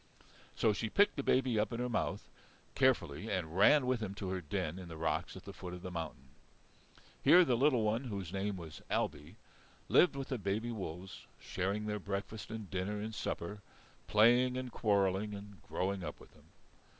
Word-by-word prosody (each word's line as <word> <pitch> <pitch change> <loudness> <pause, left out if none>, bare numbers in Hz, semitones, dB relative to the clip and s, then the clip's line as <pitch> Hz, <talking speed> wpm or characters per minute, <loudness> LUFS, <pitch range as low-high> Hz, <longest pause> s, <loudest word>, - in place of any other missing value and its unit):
So 110 -2 +3
she 110 +2 -2
picked 205 - +4
the 140 - -1
baby 130 -4 +2
up 105 -1 0
in 115 - -3
her 125 - 0
mouth 120 - -2 0.5
carefully 110 - +1
and 85 -4 -2
ran 130 +8 +6
with 125 -1 +1
him 100 -2 -4
to 100 -2 -4
her 95 -1 -2
den 90 +1 -3
in 90 - -8
the 80 -1 -8
rocks 80 0 -1
at - - -12
the - - -8
foot 90 0 -7
of 90 - -11
the 90 - -5
mountain. 80 -6 -6 0.9
Here 180 0 +8
the 125 - +2
little 130 -2 +3
one, 110 +5 0
whose 100 -6 -5
name 100 0 -1
was 80 -3 -9
Ailbe, 80 +7 -2 0.5
lived 175 - +5
with 135 0 -5
the 130 -4 -2
baby 105 +4 -1
wolves 95 -3 -7
sharing 100 +3 -2
their 105 0 -2
breakfast 100 +2 -5
and 110 -2 -6
dinner 95 +3 -2
and 110 +2 -4
supper, 105 0 -4 0.5
playing 120 +4 +5
and 130 -1 -4
quarrelling 100 -1 +1
and 100 -3 -10
growing 95 0 -1
up - - -6
with - - -16
them. - - -21
105 Hz, 190 wpm, -34 LUFS, 95-115 Hz, 0.9 s, Here